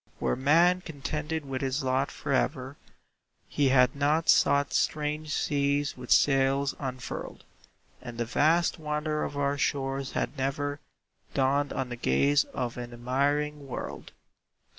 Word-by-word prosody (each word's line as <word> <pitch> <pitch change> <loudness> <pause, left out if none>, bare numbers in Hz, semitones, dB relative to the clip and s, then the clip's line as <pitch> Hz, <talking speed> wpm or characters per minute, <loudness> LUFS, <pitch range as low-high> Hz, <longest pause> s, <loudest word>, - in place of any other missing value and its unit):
Were - - 0
man 165 +7 +4
contented 155 0 -4
with 135 -1 -4
his 135 +1 -1
lot 130 +1 +1
forever, 135 0 -2 0.7
He 140 -2 +1
had 125 -1 +4
not 150 +3 +1
sought 140 0 +4
strange 150 0 -1
seas 145 0 0
with 125 -1 -10
sails 135 0 +3
unfurled, 130 -3 -6 0.6
And 120 -2 -8
the 120 - -1
vast 160 +8 +2
wonder 150 0 -2
of 145 - -4
our 140 0 0
shores 135 -1 -1
had - - -2
never 145 +2 -2 0.6
Dawned 140 +1 +1
on 130 -2 -3
the 120 - -4
gaze 140 - +2
of 125 -2 -4
an 120 0 -6
admiring 140 +4 -1
world. 130 - -6
140 Hz, 135 wpm, -28 LUFS, 130-150 Hz, 0.7 s, man